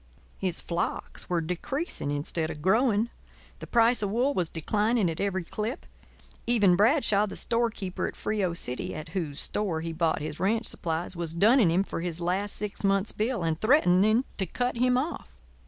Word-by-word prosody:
His 185 -3 -1
flocks 170 0 -4
were 175 -2 +1
decreasing 180 - -2
instead 150 +3 -1
of 150 -2 -7
growing; 220 +3 +2 0.5
the - - -8
price 235 0 +4
of 205 - 0
wool 245 +7 +1
was 175 - 0
declining 210 +3 +1
at 160 - -7
every 190 -2 -1
clip; 220 - -4 0.6
even 205 -7 +4
Bradshaw, 215 - +3
the - - -7
storekeeper 230 -5 -1
at - - -7
Frio 195 -5 -1
City, 125 -6 -3
at 155 - -7
whose 160 -7 -3
store 185 -7 -2
he 165 0 -4
bought 160 0 +1
his 150 0 -5
ranch 220 +4 +1
supplies, 165 +2 -2
was 170 -2 -3
dunning 215 +2 +5
him 180 +4 +2
for 165 - -5
his 175 -1 -2
last 185 +4 -1
six 210 0 -5
months' 195 +1 +2
bill 220 -2 -1
and 160 -1 -1
threatening 215 - +4
to 190 - 0
cut 245 +7 -1
him 250 +1 +3
off. 260 - -4
195 Hz, 175 wpm, -27 LUFS, 170-230 Hz, 0.6 s, dunning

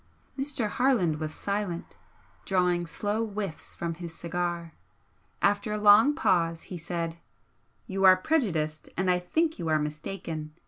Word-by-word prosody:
Mr. 270 -4 0
Harland 210 - +2
was 155 -1 -3
silent, 200 -2 -3 0.5
drawing 180 -2 +1
slow 210 +6 -1
whiffs 205 -6 -5
from 170 -1 -3
his 170 0 -8
cigar. 170 -1 -3 0.7
After 205 +1 +2
a - - -1
long 210 +7 +6
pause, 165 - +1
he 180 - -7
said 165 0 -3 0.7
"You 195 0 -2
are 185 0 +9
prejudiced, 170 - 0
and 185 0 +2
I 180 - +2
think 315 - 0
you 165 - -3
are 155 -1 +3
mistaken. 155 +1 -5
180 Hz, 140 wpm, -28 LUFS, 165-210 Hz, 0.7 s, are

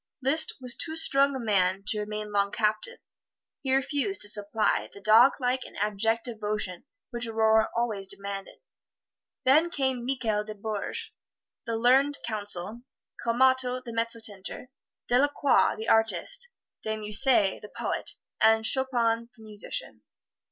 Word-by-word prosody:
Liszt 310 +4 +2
was 250 -2 -1
too 320 -1 -3
strong 280 -3 +3
a - - -3
man 195 -4 +1
to 215 0 +1
remain 210 0 -4
long 200 -1 +1
captive 215 - -1 0.6
he 265 - -2
refused 290 +8 0
to 205 - +1
supply 210 +1 0
the - - -13
doglike 245 +4 +4
and - - -12
abject 215 +3 0
devotion 210 -6 -3 0.3
which 240 -1 -3
Aurore 220 0 +3
always 215 -5 -1
demanded. 195 0 -6 0.8
Then 305 +6 +5
came 265 -7 -1
Michael 235 -5 -1
de 215 0 -8
Bourges 220 - -5 0.6
the 230 -1 -1
learned 265 +5 +3
counsel, 210 0 -4 0.4
Calmatto 255 +1 +2
the 235 - -7
mezzotinter, 230 -1 -3 0.4
Delacroix 285 +2 +3
the 220 +1 -6
artist, 485 - +2 0.3
De 220 0 -3
Musset 210 -1 +2
the 210 - -10
poet, - - -4 0.3
and 220 0 +4
Chopin 235 -3 +1
the 220 - -15
musician. 210 -1 -4
225 Hz, 130 wpm, -27 LUFS, 210-260 Hz, 0.8 s, Then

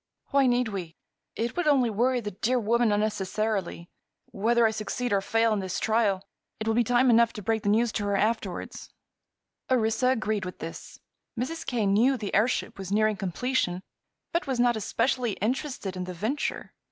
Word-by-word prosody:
"Why 275 -1 +4
need 245 -1 +2
we? 180 -5 -6 0.4
It 235 +1 -2
would 355 -2 -1
only 260 -6 +4
worry 245 +4 +1
the 210 -2 -5
dear 230 +6 0
woman 235 0 +2
unnecessarily. 205 -3 -1 0.4
Whether 230 +3 +2
I 220 - +3
succeed 220 +2 -3
or 195 - +2
fail 225 +2 +2
in 210 - 0
this 190 -2 -3
trial, 210 -4 +1 0.3
it 220 - -3
will 225 - +2
be 240 +1 +3
time 245 +2 +3
enough 230 0 +4
to 210 - -8
break 220 +2 0
the 205 - 0
news 225 +2 +3
to 205 - -2
her 200 -1 +1
afterward." 215 -4 -1 1.0
Orissa 230 -1 +2
agreed 220 -5 0
with 180 0 -6
this. 165 +1 -8 0.4
Mrs. 320 +7 -4
Kane 215 -6 +1
knew 255 +6 +4
the 210 -4 -5
airship 220 -1 +1
was 190 0 -6
nearing 215 +1 +2
completion 190 0 -1 0.5
but 340 -2 -1
was 260 -3 -1
not 240 -1 +4
especially 240 +2 0
interested 235 -3 -3
in 180 0 -4
the 180 0 -6
venture. 225 - -3
220 Hz, 180 wpm, -27 LUFS, 200-245 Hz, 1.0 s, Why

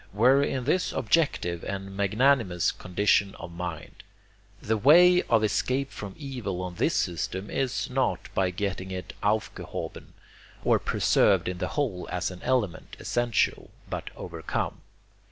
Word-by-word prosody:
were 125 +7 +5
in 135 -2 -1
this 180 +8 +1
objective 115 - +1
and 95 0 -5
magnanimous 105 -2 +2
condition 100 +2 +1
of 85 +1 -9
mind. 85 -2 -6 0.6
The 110 - 0
way 175 - +7
of 115 -2 +4
escape 130 +6 0
from 100 -2 -7
evil 120 -10 -4
on 90 -1 -5
this - - +1
system 95 +3 -2
is 130 0 -1
NOT 130 -8 -1
by 95 -1 +2
getting 95 0 -3
it 90 -1 -6
'aufgehoben,' 105 +1 -3 0.5
or - - +4
preserved 95 -4 +3
in 90 -1 -3
the - - -1
whole 115 -12 -1
as 90 +1 -1
an 90 - -10
element 120 -10 -1
essential 120 -1 0 0.2
but - - -4
'overcome.' - - -4
105 Hz, 135 wpm, -27 LUFS, 90-130 Hz, 0.6 s, way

